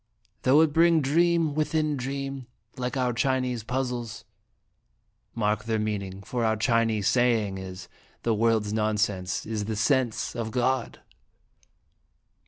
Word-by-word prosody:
"Though 140 +4 +5
it 160 -2 +2
bring 165 0 +5
dream 165 +2 +2
within 155 0 0
dream, 135 0 -4 0.3
like 125 +1 -3
our 125 -1 +1
Chinese 125 0 0
puzzles 120 -3 -3 1.1
mark 105 -1 0
their 115 -1 0
meaning, 100 -3 -3
for 120 +3 -2
our 110 -1 +2
Chinese 110 -1 +1
saying 115 -6 +2
is, 95 -1 -8 0.2
' - - -33
The 115 - +2
world's 110 -1 +1
nonsense 105 -4 -1
is 110 -2 -3
the 110 +1 -3
sense 120 +1 0
of 115 -2 -3
God!"' 125 +1 -1
115 Hz, 130 wpm, -26 LUFS, 110-130 Hz, 1.1 s, Though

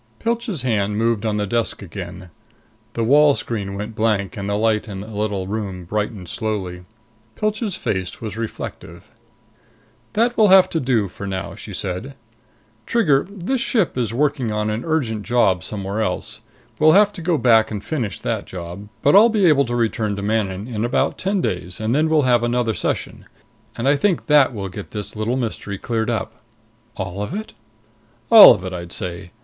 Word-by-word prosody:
Pilch's 230 - -2
hand 105 -4 0
moved 115 -1 +1
on 105 -1 0
the 105 - 0
desk 115 0 -1
again. 90 -1 -8 0.6
The 115 - -1
wall 145 +4 +5
screen 100 -4 -4
went 105 +3 -5
blank, 105 -5 0
and 100 0 -4
the 100 - 0
light 110 0 +1
in 95 -2 -6
the 105 - -9
little 100 -2 -2
room 95 -3 -4
brightened 105 0 -3
slowly. 95 -4 -4 0.5
Pilch's 215 - -1
face 95 -2 -3
was 110 -2 -6
reflective. 115 -1 -7 1.0
"That 235 +3 +2
will 215 - +5
have 190 -1 +6
to 165 - 0
do 125 -7 +1
for 100 +2 -8
now," 95 -2 -4
she - - -10
said. 100 +9 -4 0.7
"Trigger, 150 -13 +2
this 205 +6 -2
ship 225 -8 +1
is 120 -4 -1
working 135 -1 0
on 105 0 -1
an 110 +3 -3
urgent 135 -10 -1
job 105 -6 +2
somewhere 100 +1 -4
else. 110 0 -2 0.4
We'll 155 +1 +6
have 205 +1 +5
to 180 - -8
go 165 -1 +1
back 115 -5 +4
and 105 -2 -6
finish 120 - -3
that - - -2
job. 90 +3 -8
But 145 - +5
I'll 220 +4 +8
be 215 -4 +2
able 145 -4 +5
to 120 - -3
return 110 -3 0
to 100 - -5
Manon 105 -1 -1
in 110 -3 -3
about 120 - 0
ten 195 0 0
days, 90 - -3
and 110 +2 -1
then 155 +3 +2
we'll 155 -2 +3
have 125 -2 +3
another 120 -1 0
session. - - -3 0.5
And 120 - -2
I 140 - +5
think 180 +4 +1
that 145 -3 +5
will 100 -5 -5
get 95 +2 -8
this 105 -1 -7
little 110 +4 -1
mystery 110 -5 -4
cleared 115 +1 -2
up." 110 -1 -3 0.6
"All 95 0 -4
of 105 - -4
it?" 220 +1 -6 0.8
"All 225 -2 +11
of 90 - -8
it, 95 - -5
I'd 85 -1 -7
say. 90 -2 -5
110 Hz, 185 wpm, -21 LUFS, 100-140 Hz, 1.0 s, All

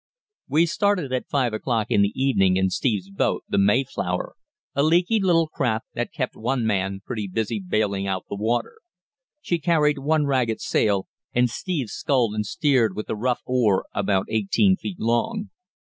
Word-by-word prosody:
We 155 +5 +4
started 180 -5 0
at 130 - -2
five 130 -5 +1
o'clock 110 -1 -1
in 100 - +4
the 100 0 +2
evening 95 -9 +2
in 95 0 +1
Steve's 100 -6 -1
boat, 100 - 0
the - - +1
Mayflower, 100 -4 0 0.4
a 140 - +1
leaky 175 +8 +3
little 170 -4 +3
craft 120 -8 -2
that 120 - -3
kept 135 -6 -3
one 120 +1 -1
man 95 -2 -1
pretty 110 -5 -4
busy 110 +3 -2
bailing 100 0 -1
out 95 -1 -2
the - - -5
water. 120 - -1 0.6
She 175 - -1
carried 150 -3 +2
one 150 +2 +1
ragged 125 -5 0
sail, 100 -3 +1 0.3
and 125 -1 +3
Steve 145 - -3
sculled 125 -4 0
and 105 -1 -2
steered 130 -6 +2
with 105 - -5
a - - -1
rough 125 +3 -1
oar 120 -7 +2
about 95 -2 +1
eighteen 110 - +2
feet 190 -1 -7
long. 205 - -1
120 Hz, 170 wpm, -24 LUFS, 105-150 Hz, 0.6 s, We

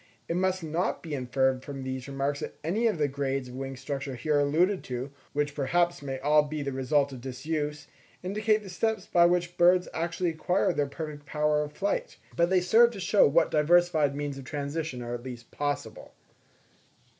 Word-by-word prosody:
It 170 - -1
must 185 0 0
not 165 +3 -1
be 160 -3 -6
inferred 130 0 0
from 135 -1 -6
these 130 0 -5
remarks 140 +1 -2
that - - -6
any 210 +9 +1
of 215 - 0
the 150 -2 +2
grades 135 -2 -2
of - - -10
wing 135 +1 -5
structure 135 0 -4
here 145 +4 +1
alluded 170 +7 +2
to, 125 +2 -4 0.2
which 145 0 0
perhaps 170 +5 +1
may 135 -2 -4
all 150 +2 +5
be 150 0 -4
the 140 - -2
result 140 +2 +1
of 130 -2 -8
disuse, 150 +3 -3 0.4
indicate 215 +3 +1
the 195 - -9
steps 220 +4 -1
by 170 -1 +5
which 175 0 0
birds 180 +1 +5
actually 170 +1 -1
acquired 175 +2 +1
their 145 -1 +1
perfect 145 0 -7
power 150 0 +1
of 150 0 -5
flight; 200 +4 -2 0.2
but 170 0 +3
they 185 -1 +3
serve 225 +6 +6
to 200 - -7
show 195 +2 +4
what 160 +3 +3
diversified 155 -2 +3
means 145 -1 -4
of - - -8
transition 145 -1 -4
are 120 0 -5
at 120 - -4
least 120 -2 -9
possible. 145 0 -4
150 Hz, 190 wpm, -28 LUFS, 135-175 Hz, 0.4 s, serve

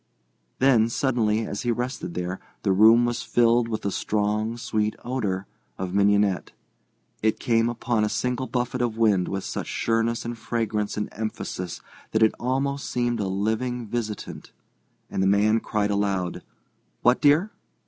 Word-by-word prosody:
Then, 120 -4 +4
suddenly, 115 -4 +1
as 100 - -4
he 120 - -2
rested 120 -5 -3
there, 90 +1 -3 0.2
the 100 - +2
room 110 +5 +6
was 120 -1 -1
filled 120 0 +3
with 110 -2 -3
the 100 - -1
strong, 105 +3 -1
sweet 110 -2 -1
odour 100 -7 -2 0.3
of 95 -1 -4
mignonette. 100 -1 +2 0.7
It 110 0 +2
came 115 -1 +2
as - - -2
upon 115 -2 0
a 105 - +1
single 125 +3 -1
buffet 125 0 -2
of 115 -2 -1
wind 105 -5 +3
with 95 0 -3
such - - -4
sureness 115 +1 0
and 120 0 -3
fragrance 110 -2 -2
and 105 - -1
emphasis 105 -5 -5 0.3
that 110 0 +4
it 110 - +4
almost 140 +3 -1
seemed 120 -1 0
a 100 - -1
living 110 +5 -1
visitant. 110 -2 -5 0.6
And - - -1
the 95 - +3
man 105 +3 +4
cried 105 -2 -1
aloud: 100 -3 -1 0.6
"What, 125 +1 +4
dear?" 155 +8 +4
110 Hz, 160 wpm, -25 LUFS, 105-120 Hz, 0.7 s, room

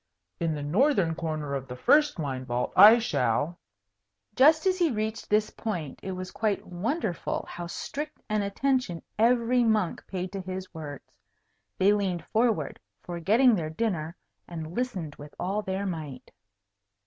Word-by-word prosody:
In 165 -2 0
the 145 - -4
northern 195 - +2
corner 155 -3 -3
of 135 -1 -3
the 125 - -7
first 295 - +4
wine 135 -5 -3
vault 125 -1 -2
I 210 +5 +10
shall 145 - 0 0.4
" 100 - -46
Just 310 +6 +5
as 375 0 +2
he 345 -2 +3
reached 220 -2 -3
this 210 0 +2
point, 170 - -4
it 190 - -4
was 185 0 -6
quite 215 -3 -1
wonderful 190 - -2
how 175 0 -6
strict 295 - -5
an 215 -1 0
attention 205 -3 -1 0.2
every 240 +1 +3
monk 215 -6 +1
paid 185 -1 -4
to 195 - -4
his 185 0 -6
words. 150 -4 -9 0.6
They 200 +2 +5
leaned 190 -4 -1
forward, 220 - 0 0.2
forgetting 210 +9 +3
their 165 -7 -1
dinner, 170 -3 -2 0.3
and 160 -1 -6
listened 190 - -3
with 145 0 -11
all 195 +4 -1
their 190 0 -3
might. 155 -8 -6
185 Hz, 155 wpm, -27 LUFS, 155-225 Hz, 0.6 s, I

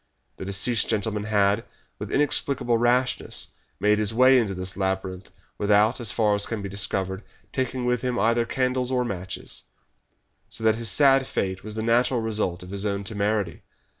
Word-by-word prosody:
The - - -6
deceased 100 +5 +1
gentleman 105 -1 -1
had, 105 0 +2 0.4
with - - -5
inexplicable 140 -4 +1
rashness, 125 +2 0 0.3
made 105 +2 +3
his 105 +1 0
way 130 +1 +6
into 100 -5 -1
this 90 0 -5
labyrinth 95 -1 -3 0.3
without, 105 +4 +3
as 115 - 0
far 105 -3 +2
as 100 0 -1
can 110 -3 -4
be - - -3
discovered, 95 -1 -2 0.3
taking 130 -1 -2
with 125 -1 +1
him 125 -1 -1
either 115 +3 +2
candles 125 -1 0
or 125 -1 +1
matches, 95 -4 -5 0.9
so 115 - -6
that 110 0 +5
his 115 0 -2
sad 135 +2 +5
fate 95 -1 -2
was 105 +1 -7
the 110 - -3
natural 120 +2 +2
result 105 -6 -2
of 90 - -10
his 100 0 -2
own 100 -1 -1
temerity. 100 -3 -1
110 Hz, 170 wpm, -25 LUFS, 100-120 Hz, 0.9 s, way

